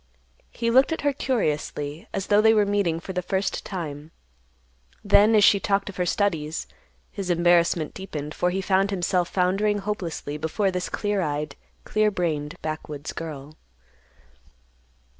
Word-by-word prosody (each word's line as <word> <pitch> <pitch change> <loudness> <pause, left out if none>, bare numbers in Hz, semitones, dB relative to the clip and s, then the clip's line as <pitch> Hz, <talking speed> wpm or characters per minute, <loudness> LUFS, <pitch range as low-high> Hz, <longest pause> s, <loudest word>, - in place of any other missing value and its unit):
He 230 0 -1
looked 260 +5 +5
at 320 - -2
her 285 -1 +1
curiously, 150 - -2
as 195 -1 -3
though 205 +1 +4
they 220 0 +5
were 210 -1 +4
meeting 200 -5 0
for 190 +3 -7
the 180 - -1
first 190 +2 -2
time. 155 -5 -6 0.9
Then, 210 +2 +5
as 210 - +5
she 200 - +6
talked 200 0 0
of 195 - -9
her 180 -1 0
studies, 165 -6 -1 0.5
his 195 -3 -5
embarrassment 170 -2 +3
deepened, 155 -6 -6
for 180 - +1
he 190 +2 -1
found 195 +1 +2
himself 180 -2 0
foundering 195 +3 +1
hopelessly 180 -7 -4
before 190 +6 0
this 180 -1 -3
clear 205 -2 -1
eyed, 150 -2 -2 0.3
clear 215 0 +2
brained 155 -6 -2
backwoods 155 -1 -5
girl. 155 -2 -7
180 Hz, 150 wpm, -25 LUFS, 155-205 Hz, 0.9 s, she